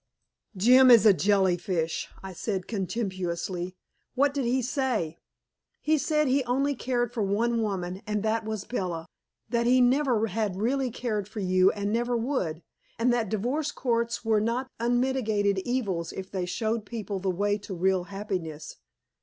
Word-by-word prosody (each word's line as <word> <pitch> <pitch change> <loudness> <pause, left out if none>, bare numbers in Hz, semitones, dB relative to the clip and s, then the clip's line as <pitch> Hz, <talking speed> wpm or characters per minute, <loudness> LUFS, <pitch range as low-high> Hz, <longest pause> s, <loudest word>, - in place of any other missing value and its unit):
"Jim 255 +6 +7
is 230 -3 +8
a 210 - +8
jellyfish," 180 -2 +1
I 190 -1 -7
said 190 0 -3
contemptuously. 185 -4 -3 0.4
"What 280 +2 +3
did 280 -3 -1
he 250 +2 +1
say?" 240 - -1 0.6
"He 310 0 +2
said 300 0 +1
he 265 +1 +2
only 275 +4 +1
cared 245 -2 -1
for 235 - -2
one 225 +4 +1
woman, 190 -3 -3
and 210 -1 -1
that 220 +1 0
was 215 -2 -4
Bella; 175 -8 -3 0.4
that 235 0 +1
he 255 +1 +5
never 250 -2 +3
had 210 -2 -2
really 255 +6 0
cared 215 -4 -3
for 215 +1 -7
you 185 -1 +4
and 205 0 -2
never 240 +1 +1
would, 225 - -2 0.3
and 240 +2 +2
that 230 -4 0
divorce 255 +9 -1
courts 235 -3 -1
were 220 -2 +3
not 245 +4 -1
unmitigated 235 -5 +1
evils 195 -7 -2
if 190 0 -7
they 185 -2 -2
showed 220 +4 -1
people 210 -4 -4
the 190 0 -1
way 205 +3 0
to 200 -1 -7
real 185 0 +1
happiness. 185 -6 -5
215 Hz, 160 wpm, -27 LUFS, 190-245 Hz, 0.6 s, is